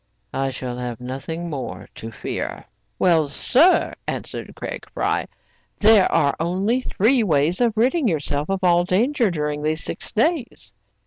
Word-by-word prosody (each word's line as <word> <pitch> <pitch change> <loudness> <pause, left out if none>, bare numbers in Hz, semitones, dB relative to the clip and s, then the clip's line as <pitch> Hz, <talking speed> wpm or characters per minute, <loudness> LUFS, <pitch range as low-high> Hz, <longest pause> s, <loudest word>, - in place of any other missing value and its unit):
" - - -46
I 135 0 0
shall 125 -1 -5
have 125 -1 -5
nothing 135 +7 -5
more 140 -6 -6
to 115 - -8
fear/* 115 - -5 0.3
"Well, 165 -5 +3
sir/* 270 - +3
answered - - -5
Craig - - -7
Fry, - - -1 0.5
"there 215 -2 +5
are 145 -4 +2
only 190 +9 0
three 245 +2 +2
ways 165 0 +1
of 230 -3 +2
ridding 260 +5 +2
yourself 145 -3 -1
of 195 -1 -1
all 175 -1 +4
danger 230 +6 +2
during 150 -3 -2
these 155 +1 -1
six - - -5
days.' 255 +2 -1
175 Hz, 150 wpm, -22 LUFS, 145-225 Hz, 0.5 s, there